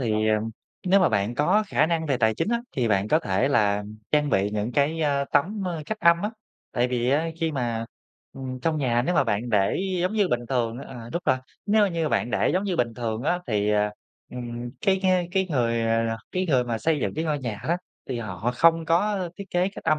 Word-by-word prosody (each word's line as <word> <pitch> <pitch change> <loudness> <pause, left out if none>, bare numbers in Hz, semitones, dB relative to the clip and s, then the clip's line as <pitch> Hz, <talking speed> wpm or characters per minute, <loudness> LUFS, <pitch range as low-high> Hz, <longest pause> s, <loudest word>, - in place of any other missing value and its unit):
thì, 110 -3 +1
ờ, 110 - +4 0.5
nếu 195 +2 +5
mà 185 - +5
bạn 100 +4 0
có 185 - +3
khả 155 -5 +2
năng 165 -1 0
về 135 -3 +1
tài 110 -2 +2
chính 205 - -1
á, 235 0 +1
thì 125 -7 0
bạn 100 0 +1
có 155 - +4
thể 110 - 0
là 105 -6 +2 0.3
trang 150 -1 +2
bị 100 +1 +2
những 105 +3 -2
cái, 150 +3 +1
ơ, 140 -2 +1
tấm, 195 +8 +1
ơ, 165 -3 -3
cách 220 0 -4
âm 170 +1 +5
á. 210 - -1 0.4
Tại 125 +1 +1
vì 125 0 0
á 155 +4 +2
khi 160 -1 0
mà, 115 -4 -2 0.5
ừm, 130 -1 -6
trong 155 +2 0
nhà 120 -3 +1
nếu 180 - 0
mà 140 - +4
bạn 115 +2 -1
để 100 -3 +2 0.2
giống 180 +4 0
như 205 -4 +2
bình 120 -1 -1
thường 120 -2 0
à, 120 -4 -9
đúng 175 - -2
rồi, 130 - +3 0.3
nếu 210 0 +4
như 165 -3 -1
bạn 120 - 0
để - - +2
giống 185 +3 +1
như 190 -3 -1
bình 120 -4 0
thường 115 -1 -3
á 175 +4 +1
thì, 105 -2 +1
ờ, 105 0 +2 0.4
ừm, 120 -1 -6
cái 195 -3 +3
ng 180 -2 +2
cái 190 0 +1
người, 115 -5 +1
à, 115 0 +2
là 115 0 -1 0.2
cái 185 0 0
người 130 -6 +3
mà 115 -2 -2
xây 160 +2 +1
dựng - - -1
cái 160 +2 -2
ngôi 150 -2 0
nhà 115 -6 -5
đó, 170 - +3 0.3
thì 125 -2 -2
họ 110 +1 -3
không 165 +3 +4
có 185 +2 +1
thiết 200 - -6
kế 180 +2 +2
cách 200 - -11
âm 155 - +3
135 Hz, 245 wpm, -25 LUFS, 115-170 Hz, 0.5 s, nếu